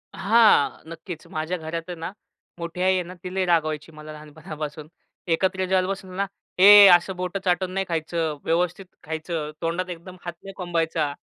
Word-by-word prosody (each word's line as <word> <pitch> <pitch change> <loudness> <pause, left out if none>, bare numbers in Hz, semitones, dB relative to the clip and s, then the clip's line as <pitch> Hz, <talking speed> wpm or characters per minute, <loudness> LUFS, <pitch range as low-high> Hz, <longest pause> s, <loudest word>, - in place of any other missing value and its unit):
हां, 220 -7 +4
नक्कीच. 165 0 -8
माझ्या 160 +3 -3
घरात 165 0 -5
आहे 180 - -4
ना, 165 +2 -5 0.5
मोठी 170 +1 -5
आई 190 +1 +4
आहे 185 -1 0
ना 175 +1 -10
ती 180 - -6
लय 190 -1 +1
रागवायची 155 -3 0
मला 155 0 -11
लहानपणापासून. 150 0 -8 0.5
एकत्र 190 +1 0
जेवायला 185 0 +1
बसू 190 -1 -5
ना, 200 +1 0 0.3
"ए 205 +1 +10
असं 175 +2 -1
बोट 180 +1 -3
चाटून 180 0 +1
नाही 195 0 -1
खायचं, 160 -1 -2
व्यवस्थित 175 +3 0 0.2
खायचं, 160 -1 -4
तोंडात 175 +2 -2
एकदम 180 +1 -8
भात 175 - -4
नाही 195 0 -9
कोंबायचा." 165 -4 -1
175 Hz, 170 wpm, -24 LUFS, 160-185 Hz, 0.5 s, ए